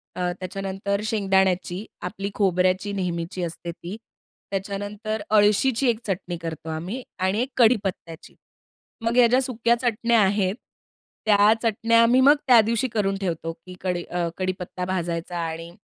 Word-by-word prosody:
अ, 180 -1 -1
त्याच्यानंतर 195 +2 -3
शेंगदाण्याची, 190 -2 +1 0.2
आपली 195 +2 -4
खोबऱ्याची 185 0 +1
नेहमीची 180 -1 -3
असते 170 0 -5
ती. 175 +4 -8 0.5
त्याच्यानंतर 205 +2 -4
अळशीची 220 +5 +3
एक 225 -2 0
चटणी 185 -2 -3
करतो 160 -1 -6
आम्ही 175 +11 -4 0.2
आणि 190 +4 +1
एक 255 - -2
कढीपत्त्याची. 200 -8 0 0.7
मग 230 +1 0
ह्या 245 -1 +7
ज्या 250 +3 +3
सुक्या 235 -2 +1
चटण्या 235 -1 +2
आहेत. 195 -1 +2 0.7
त्या 205 0 +6
चटण्या 230 0 +3
आम्ही 240 +3 +5
मग 285 +3 +7
त्या 245 -3 +8
दिवशी 230 +4 0
करून 200 -4 0
ठेवतो, 165 -3 -3
की 175 +3 -13
कडी 180 -2 -2
अ, 175 -1 -2
कढीपत्ता 185 -1 -3
भाजायचा 175 -1 -3
आणि 165 0 -4
195 Hz, 140 wpm, -24 LUFS, 180-220 Hz, 0.7 s, त्या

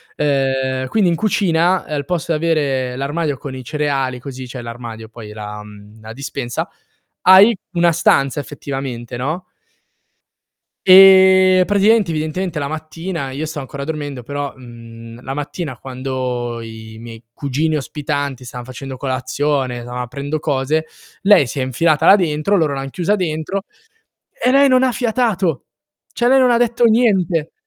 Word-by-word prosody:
ehm, 135 -2 0
quindi 195 +2 +2
in 170 - +1
cucina 180 -3 +1
al 145 -2 -3
posto 170 +1 -2
di 155 - +2
avere 135 -6 0
l'armadio 145 +2 -2
con 140 -1 -7
i 130 -1 -7
cereali 135 -3 -2
così 130 0 -8
cioè 125 0 -7
l'armadio 115 -2 -8
poi, 110 -2 -10
la 105 0 -7
mhmm, 105 +1 -14
la 110 +1 -9
dispensa, 125 -2 -4 0.5
hai 195 +5 +7 0.2
una 170 -1 +3
stanza 145 -4 +2
effettivamente, 130 -2 -6
no? 155 +8 -3 1.4
E 190 0 +7
praticamente, 205 -1 +3
evidentemente 160 +3 -3
la 140 -1 -2
mattina 160 0 -5
io 140 +4 -4
stavo 155 -1 -5
ancora 140 +1 -7
dormendo, 145 -4 -5
però, 145 +2 -4
mhmm, 115 -1 -12
la 135 +1 -5
mattina 145 -1 -5
quando 125 -2 -4
i 110 -1 -10
miei 115 0 -10
cugini 145 +5 -1
ospitanti 140 -2 -3
stan 120 0 -8
facendo 130 +1 -8
colazione, 130 -1 -2
stavan 125 +1 -5
aprendo 140 +5 -4
cose, 150 +2 -1 0.3
lei 200 -8 +6
si 135 - -5
è - - 0
infilata 155 +5 +1
là 195 - +9
dentro, 170 +1 +1
loro 155 -5 +1
l'han 135 0 -4
chiusa 180 +8 0
dentro 180 +2 -3 0.7
e 250 - 0
lei 275 +1 +5
non 255 0 +4
ha 260 - +3
fiatato. 220 - 0 0.5
Cioè, 240 - +1
lei 265 +2 +5
non 250 -2 +4
detto 240 0 +1
niente. 195 -9 +2
145 Hz, 150 wpm, -18 LUFS, 130-175 Hz, 1.4 s, là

